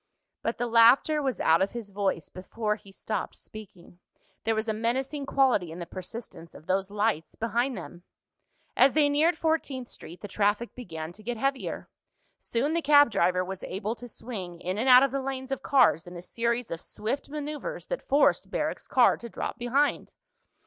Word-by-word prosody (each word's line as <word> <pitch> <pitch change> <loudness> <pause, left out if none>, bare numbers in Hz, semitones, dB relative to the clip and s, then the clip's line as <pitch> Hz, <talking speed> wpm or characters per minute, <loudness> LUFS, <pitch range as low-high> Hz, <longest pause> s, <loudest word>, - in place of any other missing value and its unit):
But 230 - -2
the 245 - -1
laughter 240 +6 +5
was 265 -3 -2
out 165 +2 +4
of 195 - 0
his 230 -4 -7
voice 195 -4 -1
before 210 +3 -3
he 200 -2 -16
stopped 205 0 -4
speaking. 180 -5 -13 0.5
There 225 0 +2
was 220 +1 -2
a 220 - +1
menacing 265 +6 -2
quality 255 -13 +2
in 165 - -8
the 175 - -5
persistence 185 -2 -9
of - - -13
those 190 +2 0
lights 205 -6 -1
behind 240 +2 -1
them. 175 -1 -9 0.7
As 265 - +5
they 295 -1 +4
neared 315 +4 +3
Fourteenth 300 -6 -1
Street 175 - -10
the 205 - -6
traffic 205 +3 0
began 160 -9 -7
to 205 - -14
get 235 +2 -4
heavier. 275 +3 -2 0.5
Soon 270 +7 -1
the 335 - +1
cab 290 -3 +6
driver 185 -2 +2
was 190 0 -6
able 205 +4 -3
to 245 +1 -10
swing 190 -7 -7
in 185 +4 -3
and 260 +4 +1
out 250 +1 +9
of 275 - +2
the 275 0 -1
lanes 265 0 -5
of 270 -1 -2
cars 220 - +3
in 175 - -9
a - - -7
series 235 +4 -2
of 165 0 -4
swift 230 +8 -4
maneuvers 300 - -5
that - - -4
forced 285 +2 +2
Barrack's - - -3
car - - +4
to 235 - -9
drop 235 - -5
behind. 260 +5 0
230 Hz, 190 wpm, -27 LUFS, 195-270 Hz, 0.7 s, out